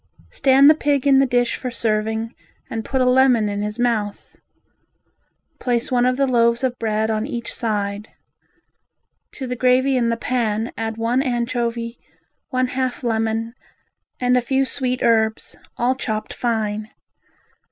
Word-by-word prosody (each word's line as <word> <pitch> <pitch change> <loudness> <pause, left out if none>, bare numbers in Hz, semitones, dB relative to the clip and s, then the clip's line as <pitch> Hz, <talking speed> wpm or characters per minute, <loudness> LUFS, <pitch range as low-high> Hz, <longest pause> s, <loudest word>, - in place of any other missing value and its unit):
Stand 275 +1 +5
the 305 - +9
pig 290 -3 0
in 275 -1 +5
the 270 - +3
dish 245 -1 +1
for 255 - -4
serving 220 0 -1 0.4
and 225 -1 -3
put 265 +2 -1
a - - +3
lemon 250 -3 +4
in 205 0 -3
his 210 +1 -4
mouth. 225 -4 -2 1.2
Place 240 -1 -1
one 245 0 +3
of 255 0 +1
the 275 - +3
loaves 235 -1 +2
of 250 -1 -1
bread 220 0 0
on 220 +2 -1
each 240 -5 -5
side; 205 -2 -2 1.2
to 270 - -6
the 250 0 -3
gravy 255 +2 +3
in 235 -2 +1
the 230 - 0
pan 230 -2 -1
add 225 0 -4
one 235 +3 +1
anchovy, 235 -2 -2 0.5
one 255 -1 0
half 255 0 -2
lemon 225 0 -1 0.7
and 250 0 +2
a 250 - +3
few 265 +2 +1
sweet 255 -1 -1
herbs, 220 -1 +1 0.2
all 245 +2 +2
chopped 220 -4 -4
fine. 215 -2 -2
240 Hz, 150 wpm, -21 LUFS, 220-255 Hz, 1.2 s, the